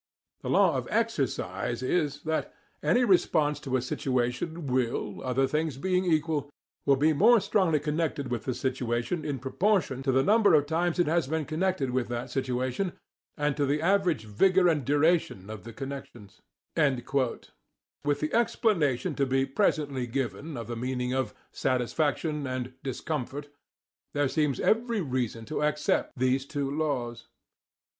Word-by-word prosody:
"The - - -5
Law - - +4
of - - -3
Exercise 120 +1 -1
is 145 0 0
that: 160 0 -1 0.3
Any 245 0 +3
response 155 -7 +3
to 130 -2 -1
a 120 - -2
situation 130 +6 -2
will, 120 -7 -1
other 130 +1 +1
things 150 0 -1
being 185 +4 +1
equal, 155 -3 +1 0.5
be 155 +3 +3
more 225 +9 +6
strongly 190 -6 +2
connected 150 -3 -2
with 120 - -2
the 130 - -1
situation 125 +4 -1
in 145 -2 -2
proportion 140 - 0
to 135 - +1
the 130 +1 +3
number 205 -1 +5
of 145 -1 +4
times 165 +3 0
it 175 - +3
has 160 -2 +1
been 160 +1 -1
connected 160 -4 0
with 125 -1 0
that 120 +1 -4
situation 130 +7 -1 0.4
and 145 -2 0
to 145 -2 +1
the 145 +2 +1
average 175 - +2
vigour 180 - +3
and 150 -6 +1
duration 145 - +1
of 110 -2 -8
the 115 - -7
connections." 125 -5 -8 0.3
With 140 0 -2
the 150 - -2
explanation 205 - +1
to 140 -2 0
be 135 +1 +2
presently 135 -4 0
given 135 +4 -3
of 115 - -5
the 120 +2 -5
meaning 125 +1 -2
of 130 0 -1 0.2
"satisfaction" 145 +3 0
and 130 0 -4
"discomfort," 145 +1 -4 0.7
there 145 -1 +2
seems 145 -2 0
every 230 -1 +2
reason 125 -6 -2
to 155 - -3
accept 150 -1 0
these 130 +1 +2
two 140 -2 -2
laws. 125 -7 -2
140 Hz, 150 wpm, -28 LUFS, 130-160 Hz, 0.7 s, more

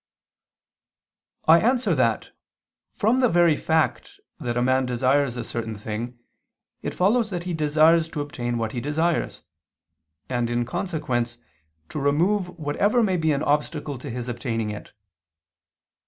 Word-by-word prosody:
I 165 +2 +8
answer 250 +4 +2
that, - - 0 0.6
From 225 +5 +1
the 250 -2 +4
very 170 -3 +4
fact 160 +1 -1 0.2
that 120 0 -3
a - - +2
man 130 0 +2
desires 130 +1 +1
a 120 - -3
certain 115 -1 -4
thing 110 +4 -5 0.6
it - - -4
follows 215 +5 +2
that 175 -3 -4
he 180 0 -3
desires 160 +1 +3
to 150 - -4
obtain 120 -4 -3
what 110 -1 -2
he 120 - -4
desires, 160 +4 -1 0.8
and, 120 -2 -1
in 120 0 0
consequence, 140 -7 -2 0.5
to - - -4
remove 175 +8 +2
whatever 200 +10 +1
may 190 -4 +1
be 160 -2 +1
an 145 +1 0
obstacle 150 -2 -1
to 140 - -7
his 125 0 -5
obtaining 115 -3 -2
it. 105 - -9
145 Hz, 140 wpm, -24 LUFS, 120-170 Hz, 0.8 s, I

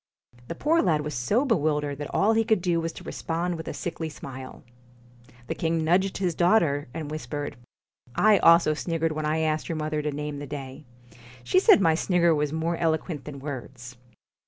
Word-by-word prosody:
The 170 - -5
poor 325 - +2
lad 155 -4 +2
was 150 0 -5
so 200 - +1
bewildered 150 - 0
that 145 - -5
all 215 +3 +3
he 225 0 +3
could 220 -2 +2
do 175 -2 0
was 165 0 -3
to - - -11
respond 170 +2 -3
with 160 -1 -7
a - - -3
sickly 165 -2 -4
smile. 130 -3 -9 0.8
The - - -3
king 165 -1 -1
nudged 185 +4 +2
his 185 -3 0
daughter, 170 -5 +2
and 150 +1 -6
whispered: 145 -1 -5 0.4
' - - -69 0.2
I 210 -2 +5
also 165 -2 +6
sniggered 165 +1 -1
when 155 0 -2
I 155 +1 0
asked 155 -1 -1
your 165 - -2
mother 155 0 -2
to 150 0 -2
name 150 0 -5
the 145 - -7
day. 135 +1 -8 0.6
She 125 +9 +3
said 195 - +6
my 165 -3 +4
snigger 170 0 +2
was 150 -1 0
more 165 +2 -1
eloquent 160 -2 -1
than 150 -2 -7
words.' 130 -3 -8
160 Hz, 195 wpm, -26 LUFS, 145-170 Hz, 0.8 s, also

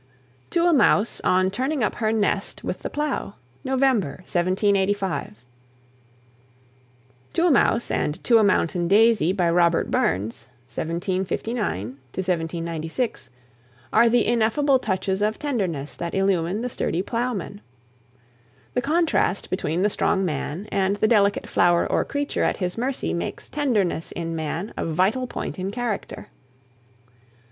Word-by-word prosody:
TO 340 0 +2
A 350 - +4
MOUSE, 230 -5 +3
ON 185 +1 +3
TURNING 260 +5 -1
UP 210 - +1
HER 220 -2 0
NEST 205 -2 -1
WITH 180 - -3
THE - - -5
PLOW, 295 -8 -3 0.3
NOVEMBER, 255 - +1
1785 190 - 0 1.9
"To 340 - +2
a 350 - +4
Mouse" 235 -3 +3
and 150 +5 -2
"To 230 -2 +5
a - - +4
Mountain 175 -3 +1
Daisy," 210 -3 +4
by 185 -3 +1
Robert 170 0 +2
Burns 100 +5 -1 0.3
(1759 185 - -2 0.7
96), 165 +9 -3 0.6
are 230 +2 +6
the 240 +1 +3
ineffable 260 +4 +2
touches 190 -2 -1
of 215 +1 +1
tenderness 185 - -2
that 170 0 -4
illumine 195 +1 +1
the 250 - -2
sturdy 180 -6 -1
plowman. 230 -4 -3 1.1
The 250 - +1
contrast 310 - +1
between 175 -1 -1
the 210 - +3
strong 195 -1 +1
man 160 +4 -3
and 195 0 +1
the 210 +1 +2
delicate 205 -3 +2
flower 175 -1 +3
or - - +1
creature 285 0 -2
at - - +1
his 180 -2 -2
mercy 255 +3 -2
makes 170 - -4
tenderness 215 - 0
in 165 -1 -4
man 160 +5 -4
a - - -3
vital 190 +10 +1
point 210 - -5
in 185 +1 -2
character. 225 -1 -4
200 Hz, 135 wpm, -24 LUFS, 175-235 Hz, 1.9 s, are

